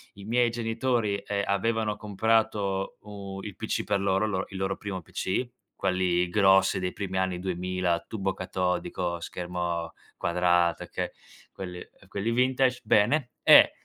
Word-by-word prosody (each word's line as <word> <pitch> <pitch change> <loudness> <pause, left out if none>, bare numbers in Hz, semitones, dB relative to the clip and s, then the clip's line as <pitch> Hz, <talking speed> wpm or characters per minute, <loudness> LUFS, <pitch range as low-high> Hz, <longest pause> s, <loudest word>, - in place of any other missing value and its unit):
i 100 0 -11
miei 120 +1 +3
genitori, 115 -2 0
ehm, 100 -1 -1
avevano 110 +1 0
comprato 105 -2 0
u 100 -2 -7
il 100 -2 -7
PC 110 - -2
per 100 -1 +1
loro, 95 +1 +2
il - - -1
lor 95 0 -1
il 95 - -7
loro 95 0 -1
primo 95 -3 -5
PC, 95 +9 -2 0.3
quelli 90 -1 +1
grossi 95 0 +4
dei 90 0 -2
primi 95 -2 -4
anni 95 -1 0
2000, 90 -1 -1
a 85 - 0
tubo 95 -3 -2
catodico, 90 -1 -2
schermo 85 -1 -3 0.2
quadrato 85 -1 +2
che - - -4 0.4
quelli 90 -2 -6
ehm, - - -15
quelli 100 +4 -1
vintage, 125 +1 +2
bene, 120 +5 +3
e - - +9
95 Hz, 150 wpm, -27 LUFS, 90-110 Hz, 0.4 s, e